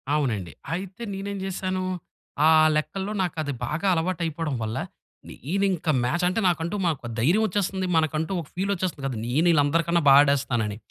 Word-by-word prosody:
అవునండి. 110 Hz, -, -1 dB, 0.2 s
అయితే, 190 Hz, +6 st, -5 dB
నేనేం 200 Hz, +1 st, -4 dB
జేశాను 185 Hz, 0 st, -2 dB, 0.6 s
ఆహ్, 155 Hz, 0 st, +6 dB
లెక్కల్లో 190 Hz, +6 st, -2 dB
నాకది 155 Hz, -5 st, -2 dB
బాగా 155 Hz, +9 st, -2 dB
అలవాటయిపోడం 165 Hz, -3 st, -2 dB
వల్ల, 110 Hz, 0 st, -3 dB, 0.5 s
నేనింక 185 Hz, -, -2 dB, 0.2 s
మ్యాచంటే, 180 Hz, -, +1 dB
నాకంటూ 170 Hz, +1 st, 0 dB
మాకో 150 Hz, -8 st, -1 dB
ధైర్యవొచ్చేస్తంది, 190 Hz, -, +1 dB
మనకంటూ 155 Hz, +2 st, 0 dB
ఒక 155 Hz, -, -12 dB
ఫీలొచ్చేస్తది 185 Hz, -5 st, -2 dB
కదా! 130 Hz, -4 st, -4 dB
నేను 155 Hz, +8 st, +2 dB
ఈళ్ళందరికన్నా 165 Hz, +3 st, +2 dB
బా -, -, +9 dB
ఆడేస్తానని. 125 Hz, -7 st, 0 dB
165 Hz, 125 wpm, -25 LUFS, 145-185 Hz, 0.6 s, బా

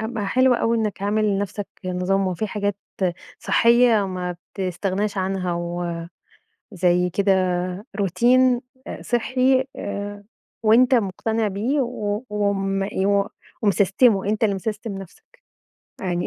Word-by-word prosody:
أبقى 220 Hz, -2 st, -3 dB
حلو 255 Hz, +4 st, +4 dB
أوي 230 Hz, -1 st, +1 dB
إنك 210 Hz, -3 st, -2 dB
عامل 215 Hz, +2 st, +1 dB
لنفسك 205 Hz, 0 st, -1 dB, 0.2 s
نظام 185 Hz, +2 st, 0 dB
وفي 185 Hz, +4 st, -2 dB
حاجات 205 Hz, -1 st, -2 dB, 0.6 s
صحّية 235 Hz, -3 st, +4 dB
ما 180 Hz, -2 st, -4 dB, 0.2 s
بتستغناش 195 Hz, +2 st, -2 dB
عنها 185 Hz, -1 st, -1 dB, 1.2 s
وزي 180 Hz, -1 st, +2 dB
كده 190 Hz, -1 st, +2 dB, 0.4 s
routine 245 Hz, +6 st, +3 dB, 0.3 s
آآ -, -, -6 dB
صحّي 255 Hz, +2 st, +2 dB
آآ 205 Hz, 0 st, -5 dB, 0.4 s
وأنت 240 Hz, +4 st, +5 dB
مقتنع 220 Hz, +1 st, 0 dB
بيه 225 Hz, +9 st, -1 dB
و 220 Hz, -3 st, -2 dB
وم 195 Hz, -2 st, 0 dB
ي 195 Hz, -1 st, -1 dB
و 200 Hz, +1 st, +2 dB, 0.3 s
ومسستِمُه 205 Hz, +1 st, +3 dB
أنت 215 Hz, +1 st, 0 dB
اللي 205 Hz, -3 st, +2 dB
مسستِم 210 Hz, +1 st, -4 dB
نفسك. 190 Hz, -3 st, -14 dB, 0.6 s
يعني 175 Hz, -2 st, -1 dB
205 Hz, 120 wpm, -22 LUFS, 190-225 Hz, 1.2 s, وأنت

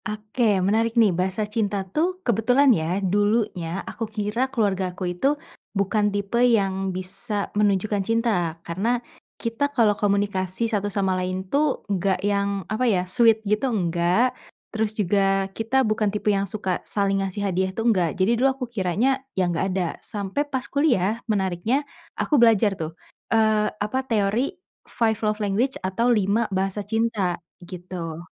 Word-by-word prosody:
Oke. 215 Hz, 0 st, 0 dB
Menarik 225 Hz, +3 st, +1 dB
nih 215 Hz, -5 st, +5 dB
bahasa 185 Hz, +4 st, -1 dB
cinta 205 Hz, -2 st, -2 dB
tuh, 335 Hz, -, -1 dB
kebetulan 245 Hz, +4 st, +4 dB
ya 165 Hz, 0 st, -1 dB
dulunya 205 Hz, -3 st, 0 dB
aku 225 Hz, -1 st, -5 dB
kira 220 Hz, +4 st, -1 dB
keluargaku 190 Hz, -6 st, -1 dB
itu 275 Hz, +12 st, +1 dB, 0.4 s
bukan 205 Hz, +1 st, +2 dB
tipe 205 Hz, +3 st, -1 dB
yang 195 Hz, -5 st, +2 dB
bisa 190 Hz, +3 st, -4 dB
menunjukkan 205 Hz, 0 st, +1 dB
cinta, 205 Hz, -6 st, 0 dB
karena 200 Hz, +9 st, 0 dB, 0.4 s
kita 230 Hz, +5 st, -1 dB
kalau 230 Hz, -7 st, +3 dB
komunikasi 200 Hz, 0 st, 0 dB
satu 205 Hz, -2 st, -1 dB
sama 195 Hz, -1 st, 0 dB
lain 185 Hz, +1 st, -3 dB
tuh 290 Hz, -1 st, +1 dB
nggak 195 Hz, -1 st, 0 dB
yang 200 Hz, -2 st, 0 dB
apa 215 Hz, +7 st, -1 dB
ya, 185 Hz, -4 st, +1 dB
sweet 225 Hz, +2 st, +3 dB
gitu 210 Hz, +6 st, +1 dB
nggak, 180 Hz, +3 st, +1 dB, 0.4 s
terus 220 Hz, -1 st, -1 dB
juga 195 Hz, -1 st, +2 dB
kita 250 Hz, +5 st, +1 dB
bukan 215 Hz, -1 st, +1 dB
tipe 210 Hz, +1 st, 0 dB
yang 195 Hz, -1 st, -1 dB
suka 190 Hz, -2 st, -2 dB
saling 195 Hz, -1 st, 0 dB
ngasih 195 Hz, +1 st, -3 dB
hadiah 190 Hz, +1 st, +1 dB
tuh, 225 Hz, +4 st, -4 dB
nggak. 175 Hz, -4 st, 0 dB
Jadi 190 Hz, +4 st, +2 dB
dulu 270 Hz, -, +5 dB
aku 255 Hz, -, -3 dB
kiranya 225 Hz, +7 st, +1 dB, 0.2 s
ya 185 Hz, -, +3 dB
nggak 165 Hz, -, 0 dB
ada. 185 Hz, -2 st, 0 dB
Sampai 210 Hz, +8 st, -3 dB
pas 265 Hz, -2 st, -2 dB
kuliah 235 Hz, -, +1 dB
menariknya 205 Hz, +7 st, 0 dB, 0.3 s
aku 290 Hz, -5 st, +2 dB
belajar 220 Hz, -3 st, +5 dB
tuh, 160 Hz, -2 st, -6 dB, 0.3 s
eee, 220 Hz, -1 st, +3 dB
apa 210 Hz, +5 st, -2 dB
teori 220 Hz, +3 st, +1 dB, 0.4 s
five 225 Hz, -2 st, 0 dB
love 210 Hz, -1 st, 0 dB
language 215 Hz, +6 st, 0 dB
atau 195 Hz, +6 st, +1 dB
5 215 Hz, 0 st, +2 dB
bahasa 195 Hz, +1 st, -1 dB
cinta, 210 Hz, -4 st, 0 dB, 0.2 s
gitu. 175 Hz, -2 st, -7 dB
205 Hz, 150 wpm, -24 LUFS, 190-230 Hz, 0.4 s, nih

